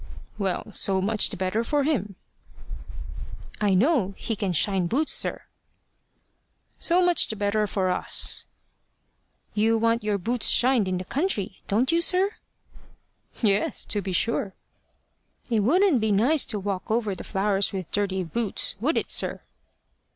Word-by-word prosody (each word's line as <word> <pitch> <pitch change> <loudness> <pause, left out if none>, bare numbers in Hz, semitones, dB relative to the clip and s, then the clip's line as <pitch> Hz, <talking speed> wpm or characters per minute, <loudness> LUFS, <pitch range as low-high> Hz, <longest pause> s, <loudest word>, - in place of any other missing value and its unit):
"Well, 195 +2 -2
so 190 -1 0
much 210 +3 +1
the 200 - -6
better 190 +5 -1
for 290 +4 0
him." 210 - -1 1.5
"I 200 -2 +3
know 210 - +2
he 225 - -3
can 200 -3 -2
shine 185 +2 +2
boots, 285 - 0
sir." - - -1 1.4
"So 355 +1 +3
much 355 -1 +2
the 220 - -4
better 210 +1 0
for 185 -2 -1
us." 180 - +2 1.1
"You 225 +2 +2
want 230 +1 +1
your 210 -1 0
boots 230 +5 +1
shined 245 -5 +3
in 185 -1 -1
the 185 - -6
country 240 - -2
don't 235 +8 +1
you, 335 0 +2
sir?" 375 +3 +2 1.1
"Yes, 205 -1 +1
to 205 - -1
be 195 - -5
sure." 195 +1 0 1.0
"It 225 - +2
wouldn't 305 - +3
be 220 -1 +1
nice 255 +10 +3
to 215 - -2
walk 195 +1 -4
over 215 -2 0
the - - -8
flowers 195 0 0
with 185 -4 -6
dirty 190 -2 -1
boots 210 +5 -1
would 290 +9 0
it, - - -2
sir?" - - 0
210 Hz, 150 wpm, -25 LUFS, 195-245 Hz, 1.5 s, I